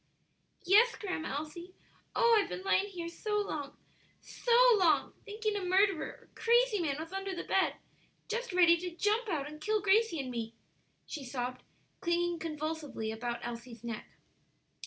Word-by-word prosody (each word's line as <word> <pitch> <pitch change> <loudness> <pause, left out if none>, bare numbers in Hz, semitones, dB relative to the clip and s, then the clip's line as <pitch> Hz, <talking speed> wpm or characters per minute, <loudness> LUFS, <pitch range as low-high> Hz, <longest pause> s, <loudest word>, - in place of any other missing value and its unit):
"Yes, 430 +6 +6
Grandma 370 -6 -4
Elsie; 340 +5 -6 0.4
oh, 470 -1 +5
I've - - -4
been 370 - -5
lying 390 +1 +2
here 355 -4 -6
so 420 +5 -2
long, 300 -9 -3 0.4
so 485 - -5 0.3
long, 340 -4 +3
thinking 430 0 -2
a 400 - -2
murderer 370 -2 +2
or - - -26
crazy 475 -2 +3
man 300 -5 0
was 325 +4 -7
under 390 0 -3
the 350 - -4
bed, 385 - +1 0.5
just 475 +1 -3
ready 345 -2 +6
to 350 0 -6
jump 430 +5 +1
out 295 -5 -1
and 305 +1 -10
kill 430 +5 +1
Gracie 410 -2 +3
and 260 -2 -4
me!" 230 -1 -4 0.5
she 295 - -6
sobbed, 250 0 -4 0.4
clinging 345 -1 0
convulsively 310 -7 -4
about 240 +1 -4
Elsie's 235 0 -7
neck. 230 -2 -5
345 Hz, 155 wpm, -32 LUFS, 295-410 Hz, 0.5 s, Yes